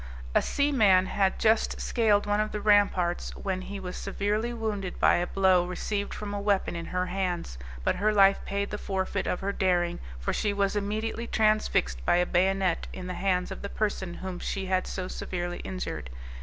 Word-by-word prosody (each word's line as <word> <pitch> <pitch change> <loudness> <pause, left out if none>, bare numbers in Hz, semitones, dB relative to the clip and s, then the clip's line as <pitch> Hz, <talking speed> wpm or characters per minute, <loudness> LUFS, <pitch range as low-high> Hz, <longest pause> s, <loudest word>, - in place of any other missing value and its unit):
A - - +4
seaman 220 -11 +3
had 190 0 +1
just 220 0 +2
scaled 215 -4 +2
one 205 0 +1
of 215 0 0
the 210 - -3
ramparts, 200 -4 +2
when 190 -1 -3
he 200 +1 -6
was 180 -1 -6
severely 210 +4 -1
wounded 215 -5 -3
by - - +5
a 175 +1 -1
blow 190 -2 +3
received 200 +3 -3
from 205 -1 -5
a 200 - -3
weapon 200 -3 +1
in 170 0 -5
her 180 0 -1
hands, 180 - -3 0.2
but - - +1
her 210 +3 +2
life 195 -1 +5
paid 200 0 -2
the 210 - -4
forfeit 190 -1 -2
of 180 - -1
her 200 +1 -1
daring, 180 -3 +1 0.2
for - - -2
she 205 -1 0
was 200 0 0
immediately 215 +3 -2
transfixed 215 - +1
by - - +3
a 180 0 +3
bayonet 190 0 +1
in 185 - -7
the 180 - -4
hands 180 0 0
of - - -6
the 200 - -5
person 195 -5 -2
whom 185 -2 -6
she 195 -1 -3
had 185 0 0
so 185 -1 -4
severely 175 -1 -4
injured. 185 - -5
195 Hz, 195 wpm, -28 LUFS, 180-205 Hz, 0.2 s, by